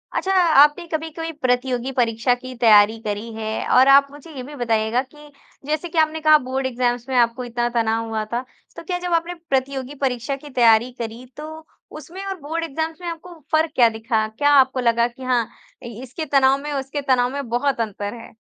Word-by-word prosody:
अच्छा, 385 Hz, -, -1 dB
आपने 330 Hz, -2 st, +5 dB
कभी-कभी 325 Hz, +1 st, -4 dB
प्रतियोगी 250 Hz, 0 st, 0 dB
परीक्षा 240 Hz, -1 st, +1 dB
की 255 Hz, +1 st, -10 dB
तैयारी 220 Hz, -2 st, +5 dB
करी 210 Hz, +2 st, -4 dB
है? 220 Hz, 0 st, -4 dB
और 255 Hz, +1 st, +5 dB
आप 275 Hz, +1 st, +7 dB
मुझे 290 Hz, +3 st, -13 dB
ये 255 Hz, -, -6 dB
भी 290 Hz, +3 st, -10 dB
बताइएगा 230 Hz, -1 st, 0 dB
कि 295 Hz, +2 st, -15 dB, 0.3 s
जैसे 310 Hz, +4 st, -2 dB
कि 330 Hz, -, -7 dB
आपने 315 Hz, 0 st, +1 dB
कहा 310 Hz, 0 st, +6 dB
बोर्ड 265 Hz, +1 st, -2 dB
एग्ज़ाम्स 245 Hz, -1 st, -1 dB
में 260 Hz, -, -2 dB
आपको 240 Hz, +1 st, +2 dB
इतना 240 Hz, 0 st, -2 dB
तनाव 230 Hz, -1 st, 0 dB
हुआ 220 Hz, -1 st, -2 dB
था, 240 Hz, +2 st, -1 dB, 0.3 s
तो -, -, -9 dB
क्या 355 Hz, +2 st, -3 dB
जब 355 Hz, -1 st, -3 dB
आपने 335 Hz, +1 st, 0 dB, 0.2 s
प्रतियोगी 265 Hz, +1 st, -2 dB
परीक्षा 250 Hz, +1 st, -2 dB
की 290 Hz, +2 st, -12 dB
तैयारी 235 Hz, -2 st, +4 dB
करी 230 Hz, +2 st, -6 dB
तो 315 Hz, +1 st, -9 dB, 0.3 s
उसमें 345 Hz, +5 st, -9 dB
और 385 Hz, -1 st, -5 dB
बोर्ड 320 Hz, +4 st, -3 dB
एग्ज़ाम्स 320 Hz, +2 st, -4 dB
में 350 Hz, -, -6 dB
आपको 335 Hz, +1 st, -9 dB
फ़र्क 315 Hz, 0 st, +2 dB
क्या 240 Hz, -2 st, +5 dB
दिखा? 220 Hz, 0 st, -1 dB
क्या 255 Hz, +7 st, 0 dB
आपको 265 Hz, -2 st, +4 dB
लगा 235 Hz, -1 st, +2 dB
कि 245 Hz, +2 st, -13 dB
हाँ, 245 Hz, -3 st, +1 dB, 0.4 s
इसके 250 Hz, +6 st, -7 dB
तनाव 275 Hz, -2 st, +3 dB
में 295 Hz, -, -5 dB
उसके 275 Hz, +1 st, -3 dB
तनाव 255 Hz, -3 st, +2 dB
में 280 Hz, -3 st, -4 dB
बहुत 245 Hz, +2 st, 0 dB
अंतर 205 Hz, -1 st, -4 dB
है? 230 Hz, -1 st, -12 dB
260 Hz, 200 wpm, -21 LUFS, 235-300 Hz, 0.4 s, आप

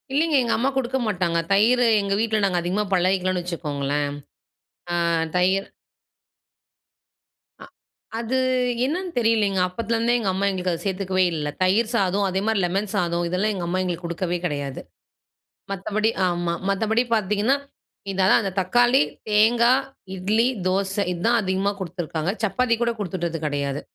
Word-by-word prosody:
இல்லைங்க. 305 Hz, +3 st, +2 dB
எங்க 235 Hz, -, 0 dB
அம்மா 255 Hz, +4 st, +1 dB
குடுக்க 260 Hz, 0 st, 0 dB
மாட்டாங்க. 175 Hz, -5 st, 0 dB
தயிர 225 Hz, +5 st, +4 dB, 0.2 s
எங்க 200 Hz, 0 st, -1 dB
வீட்டில 220 Hz, -2 st, +1 dB
நாங்க 180 Hz, -2 st, +1 dB
அதிகமா 185 Hz, +5 st, -1 dB
பழகிக்கலாம்னு 185 Hz, 0 st, +1 dB
வச்சுக்கோங்களேன். 145 Hz, -4 st, -2 dB, 0.8 s
அ -, -, 0 dB, 0.4 s
தயிர். 190 Hz, +2 st, +2 dB, 1.9 s
அ. -, -, -10 dB, 0.5 s
அது 235 Hz, +3 st, -1 dB, 0.5 s
என்னன்னு 350 Hz, +6 st, -2 dB
தெரியலைங்க 215 Hz, -5 st, +2 dB
அப்போத்துலருந்தே 230 Hz, +5 st, 0 dB
எங்க 210 Hz, -5 st, 0 dB
அம்மா 195 Hz, +2 st, 0 dB
எங்களுக்கு 185 Hz, -1 st, -2 dB
அதை 165 Hz, -, -6 dB
சேர்த்துக்கவே 190 Hz, -1 st, 0 dB
இல்ல. 150 Hz, -2 st, -2 dB
தயிர் 215 Hz, +5 st, +2 dB
சாதம் 200 Hz, -1 st, +1 dB
அதேமாதிரி 195 Hz, +2 st, 0 dB
லெமன் 195 Hz, +3 st, -1 dB
சாதம் 175 Hz, -2 st, 0 dB
இதெல்லாம் 190 Hz, +5 st, 0 dB
எங்க 180 Hz, -3 st, -4 dB
அம்மா 185 Hz, +2 st, -1 dB
எங்களுக்கு 175 Hz, -1 st, -3 dB
கொடுத்ததே 175 Hz, +1 st, -2 dB
கிடையாது. 145 Hz, -4 st, -4 dB, 0.9 s
மத்தபடி 210 Hz, +3 st, 0 dB, 0.2 s
ஆமா 175 Hz, -1 st, -1 dB, 0.2 s
மத்தபடி 220 Hz, +4 st, +1 dB
பாத்தீங்கன்னா, 210 Hz, +4 st, +1 dB, 0.6 s
இது 195 Hz, 0 st, -1 dB
அதான் 190 Hz, -, +5 dB
அந்த 195 Hz, -3 st, -3 dB
தக்காளி, 240 Hz, +8 st, +3 dB, 0.3 s
தேங்காய், 235 Hz, +5 st, +4 dB, 0.3 s
இட்லி, 210 Hz, +6 st, +1 dB, 0.2 s
தோசை 195 Hz, +2 st, 0 dB
இதுதான் 230 Hz, +7 st, +1 dB
அதிகமா 190 Hz, +1 st, 0 dB
குடுத்துருக்காங்க. 170 Hz, -2 st, -3 dB
சப்பாத்தி 230 Hz, +4 st, +1 dB
கூட 235 Hz, 0 st, +2 dB
கொடுத்துட்டது 175 Hz, -4 st, -3 dB
கெடையாது. 145 Hz, -1 st, -2 dB
195 Hz, 135 wpm, -23 LUFS, 180-225 Hz, 1.9 s, அதான்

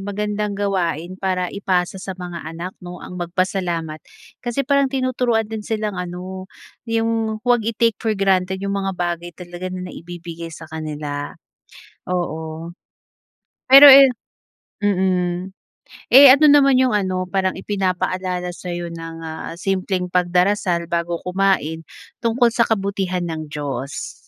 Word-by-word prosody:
magandang 205 Hz, +1 st, -3 dB
gawain 185 Hz, -3 st, -2 dB
para 185 Hz, -2 st, -1 dB
ipasa 190 Hz, -1 st, -1 dB
sa 190 Hz, -1 st, -6 dB
mga 175 Hz, -3 st, -7 dB
anak 170 Hz, +3 st, -6 dB
'no 180 Hz, 0 st, -8 dB
ang 180 Hz, 0 st, -8 dB
magpasalamat. 175 Hz, -3 st, -2 dB, 0.4 s
Kasi 245 Hz, +3 st, -2 dB
parang 280 Hz, +1 st, +2 dB
tinuturuan 255 Hz, -4 st, 0 dB
din 220 Hz, 0 st, -6 dB
silang 210 Hz, -3 st, -3 dB
ano, 185 Hz, +1 st, -7 dB, 0.4 s
'yong 225 Hz, -1 st, -1 dB
huwag 245 Hz, -1 st, +3 dB
i-take 230 Hz, 0 st, 0 dB
for 220 Hz, -2 st, -1 dB
granted 190 Hz, -1 st, +1 dB
'yong 200 Hz, +1 st, -3 dB
mga 195 Hz, -1 st, -2 dB
bagay 175 Hz, -1 st, -2 dB
talaga 175 Hz, +1 st, -7 dB
na 185 Hz, 0 st, -6 dB
naibibigay 170 Hz, -1 st, -8 dB
sa 165 Hz, 0 st, -10 dB
kanila, 150 Hz, -2 st, -5 dB, 0.7 s
oo. 165 Hz, -2 st, -4 dB, 1.0 s
Pero 275 Hz, +2 st, +11 dB
ayan 270 Hz, -1 st, +10 dB, 0.7 s
mm. 185 Hz, -2 st, 0 dB, 0.6 s
Eh, 275 Hz, +3 st, +10 dB
ano 300 Hz, 0 st, +5 dB
naman 275 Hz, -2 st, +6 dB
'yong 255 Hz, 0 st, +3 dB
ano 185 Hz, -3 st, 0 dB
parang 190 Hz, -1 st, 0 dB
ipinapaalala 185 Hz, -2 st, -2 dB
sa'yo 175 Hz, -1 st, -6 dB
ng, 165 Hz, 0 st, -7 dB
ah, 160 Hz, +1 st, -6 dB
simpleng 185 Hz, 0 st, -2 dB
pagdarasal 180 Hz, 0 st, +1 dB
bago 170 Hz, 0 st, -1 dB
kumain 180 Hz, -4 st, 0 dB, 0.3 s
tungkol 235 Hz, 0 st, +2 dB
sa 230 Hz, 0 st, +2 dB
kabutihan 195 Hz, -4 st, -1 dB
ng 160 Hz, -2 st, -5 dB
Diyos? 140 Hz, -2 st, -5 dB
185 Hz, 130 wpm, -20 LUFS, 175-210 Hz, 1.0 s, Pero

